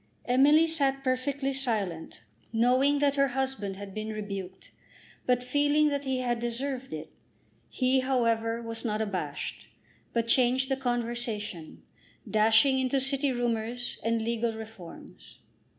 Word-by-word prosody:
Emily 285 +6 +5
sat 275 -4 0
perfectly 270 +1 -1
silent, 210 - -2 0.3
knowing 255 +5 +3
that 285 0 +2
her 275 0 +4
husband 260 -8 -1
had 195 0 -8
been 215 +1 -4
rebuked, 195 -3 -6 0.6
but 250 -1 +2
feeling 290 +3 +3
that 285 -1 -2
he 260 -1 0
had 240 -2 0
deserved 255 +3 -3
it. - - -6 0.6
He, 260 0 +2
however, 230 -3 +1
was 230 0 -5
not 215 -3 -1
abashed; 185 -9 -4 0.4
but 230 -1 0
changed 255 +2 +3
the 270 - +2
conversation, 235 -8 -3 0.4
dashing 225 +5 +4
into 260 +1 +1
city 270 +1 0
rumours, 240 0 -2
and 230 0 0
legal 230 0 -1
reforms. 210 - -11
245 Hz, 130 wpm, -28 LUFS, 220-270 Hz, 0.6 s, Emily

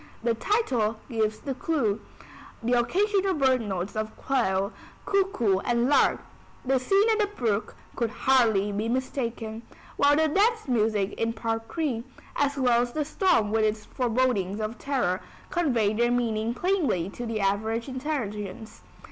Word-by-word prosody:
The 235 -1 +2
title 235 - 0 0.2
gives 215 -2 0
the 275 - -3
clew; 255 -7 0 0.6
the 240 +2 +1
occasional 385 - +2
bird 260 -4 +3
notes 195 -2 -4
of 215 0 -4
quail, 200 -7 0 0.3
cuckoo 380 - +2
and 240 +4 +1
lark, 290 - +3 0.4
the 265 0 +2
scene 390 - +3
at 440 - +1
the 420 - +3
brook, 225 - -2 0.2
could 235 -2 0
hardly 220 -5 +2
be 210 +3 -2
mistaken; 235 -3 -3 0.4
while 290 0 +5
the 315 +1 +3
dance 435 +5 +2
music 215 -5 +1
in 230 0 0
Part 225 0 -2
III, 270 -8 -1 0.3
as 285 0 +1
well 245 -3 +3
as 240 0 -3
the 305 -1 -1
storm 310 - +2
with 220 0 +2
its 215 0 0
forebodings 230 -5 0
of 215 +2 -4
terror, 250 -10 0 0.3
convey 240 - +1
their 240 +2 +2
meaning 230 -1 0
plainly 305 - +1
to 240 +2 -6
the 225 -1 -2
average 220 +4 0
intelligence. 225 -7 -4
235 Hz, 150 wpm, -26 LUFS, 215-280 Hz, 0.6 s, while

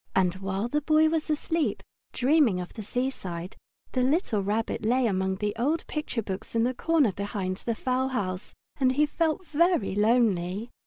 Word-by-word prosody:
And 185 -2 +3
while 195 +3 -2
the 295 +5 0
Boy 310 +1 +4
was 315 -1 -1
asleep, 310 +1 -1 0.3
dreaming 260 - +3
of 180 - -6
the 220 - -7
seaside, 195 -7 -4 0.4
the 255 - 0
little 260 - +1
Rabbit 210 +3 -1
lay 245 +3 +2
among 190 -3 0
the 205 +1 -2
old 300 +7 0
picture 295 -7 -3
books 190 +3 -6
in 230 - +3
the 250 +2 +1
corner 300 -3 +2
behind 195 -1 -3
the 230 +2 -3
fowl 255 +2 0
house, 195 -7 -3 0.2
and 260 -1 +3
he 295 +3 +3
felt 330 +4 -1
very 330 - +2
lonely. 210 -1 +1
235 Hz, 170 wpm, -27 LUFS, 195-295 Hz, 0.4 s, Boy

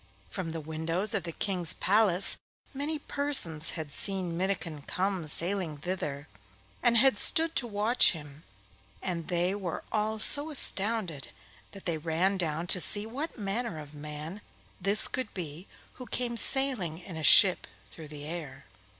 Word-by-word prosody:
From 185 -4 -6
the 165 0 -6
windows 160 +6 -3
of 195 -5 -2
the 170 - -5
King's 180 -1 -2
palace 195 -2 +4 0.4
many 290 +3 -4
persons 270 - -1
had 155 -3 -7
seen 185 +1 -3
Minnikin 175 -4 -4
come 190 -3 -3
sailing 170 -1 -1
thither, 145 -4 -6 0.5
and 235 - +2
had 255 -3 +2
stood 325 0 0
to 245 - -1
watch 215 +2 +1
him; 150 -2 -12 0.6
and 170 -3 -5
they 175 +1 -1
were 190 -5 -6
all 215 0 -2
so 285 +7 +9
astounded 205 - +3 0.4
that 195 - -13
they 165 -3 -3
ran 170 +5 -1
down 165 -2 -4
to 180 +1 -3
see 205 +4 +7
what 275 +9 -7
manner 205 -2 -4
of 150 -1 -11
man 150 +6 -9 0.4
this 200 +3 +3
could 255 -5 -5
be 170 0 -8 0.3
who 250 - -9
came 240 +1 -4
sailing 240 - 0
in 175 0 -11
a 160 - -7
ship 185 +4 +6 0.2
through 160 -2 -12
the 145 -1 -10
air. 155 -4 -9
185 Hz, 155 wpm, -28 LUFS, 160-215 Hz, 0.6 s, so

